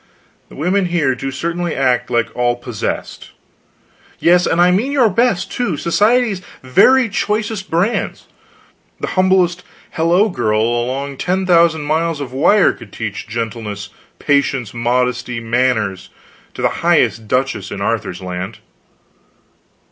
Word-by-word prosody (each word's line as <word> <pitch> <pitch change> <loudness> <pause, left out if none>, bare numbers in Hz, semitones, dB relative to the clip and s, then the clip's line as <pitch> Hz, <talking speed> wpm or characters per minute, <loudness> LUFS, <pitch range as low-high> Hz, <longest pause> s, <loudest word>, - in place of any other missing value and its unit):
The - - -13
women 180 +5 0
here 165 -7 +1
do 135 +2 -4
certainly 170 +5 -3
act 125 -2 +1
like 120 -2 -1
all 120 0 +1
possessed. 120 -3 -5 0.9
Yes, 175 +1 +3
and 170 - +1
I 175 +1 +5
mean 220 +10 +1
your 255 -7 +3
best, 215 -3 +1
too, 200 -11 -2
society's 210 - +2 0.2
very 250 - +4
choicest 210 -1 -2
brands. 180 +8 -1 0.7
The - - -3
humblest 185 -2 +2 0.3
hello 175 +6 +2
girl 110 - 0
along 130 +4 -2
ten 185 +5 -1
thousand 170 -3 +3
miles 160 +1 0
of 130 -3 -6
wire 175 +9 +4
could 115 -5 -14
teach 105 -1 -5
gentleness, 110 -3 -5 0.3
patience, 140 -6 0
modesty, 125 0 -1
manners, 115 -5 0 0.5
to - - -5
the - - +4
highest 110 -1 +2
duchess 125 -5 -1
in 100 - -6
Arthur's 100 -3 -2
land." 90 +1 -5
140 Hz, 130 wpm, -17 LUFS, 120-180 Hz, 0.9 s, I